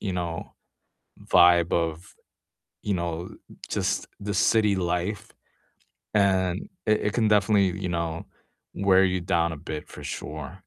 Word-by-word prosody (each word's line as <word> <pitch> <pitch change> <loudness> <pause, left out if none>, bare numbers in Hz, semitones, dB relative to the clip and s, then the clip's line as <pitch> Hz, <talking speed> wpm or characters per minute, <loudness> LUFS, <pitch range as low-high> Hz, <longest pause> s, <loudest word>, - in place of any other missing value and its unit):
you 100 -3 -3
know, 85 -2 -4 0.8
vibe 85 -1 +5
of, 85 +1 -2 0.7
you 100 - -1
know, 85 0 -3 0.4
just - - -1 0.2
the 100 0 -2
city 105 0 +3
life, 90 +3 -2 0.8
and 95 -2 +2 0.2
it 110 -1 +3
it 105 - -5
can 110 -3 +2
definitely, 100 -3 +3
you 95 - -2
know, 85 -1 -3 0.6
wear 95 0 +6
you 95 -1 0
down 85 -2 +1
a 80 - -5
bit 75 +1 -6
for - - -11
sure. 75 +1 -6
90 Hz, 135 wpm, -26 LUFS, 85-100 Hz, 0.8 s, wear